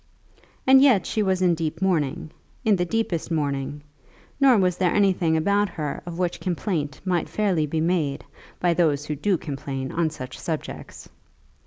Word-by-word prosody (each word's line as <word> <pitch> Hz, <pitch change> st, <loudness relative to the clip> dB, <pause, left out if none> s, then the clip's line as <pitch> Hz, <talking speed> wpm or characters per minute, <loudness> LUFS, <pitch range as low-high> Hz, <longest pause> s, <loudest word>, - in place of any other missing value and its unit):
And 265 Hz, 0 st, +7 dB
yet 255 Hz, -9 st, +5 dB
she 220 Hz, -, -1 dB
was 190 Hz, -2 st, +1 dB
in 180 Hz, -1 st, +4 dB
deep 160 Hz, -1 st, -3 dB
mourning, 160 Hz, -5 st, 0 dB, 0.3 s
in 215 Hz, -2 st, +5 dB
the 180 Hz, -1 st, 0 dB
deepest 180 Hz, -5 st, -2 dB
mourning; 145 Hz, -2 st, -2 dB, 0.6 s
nor 270 Hz, -4 st, +6 dB
was 180 Hz, -2 st, +2 dB
there 180 Hz, -2 st, +2 dB
anything 185 Hz, -5 st, +2 dB
about 200 Hz, +5 st, +2 dB
her 150 Hz, -5 st, -4 dB
of 170 Hz, -1 st, -6 dB
which 180 Hz, -1 st, -1 dB
complaint 165 Hz, -6 st, -2 dB
might 180 Hz, -3 st, 0 dB
fairly 185 Hz, -8 st, 0 dB
be 155 Hz, +2 st, -1 dB
made 160 Hz, -5 st, 0 dB, 0.3 s
by 175 Hz, -1 st, +2 dB
those 150 Hz, -4 st, +1 dB
who 150 Hz, -, -3 dB
do 190 Hz, +5 st, +1 dB
complain 135 Hz, -3 st, -5 dB
on 165 Hz, -1 st, +1 dB
such 130 Hz, -4 st, -8 dB
subjects. 160 Hz, -3 st, -6 dB
170 Hz, 165 wpm, -24 LUFS, 150-190 Hz, 0.6 s, And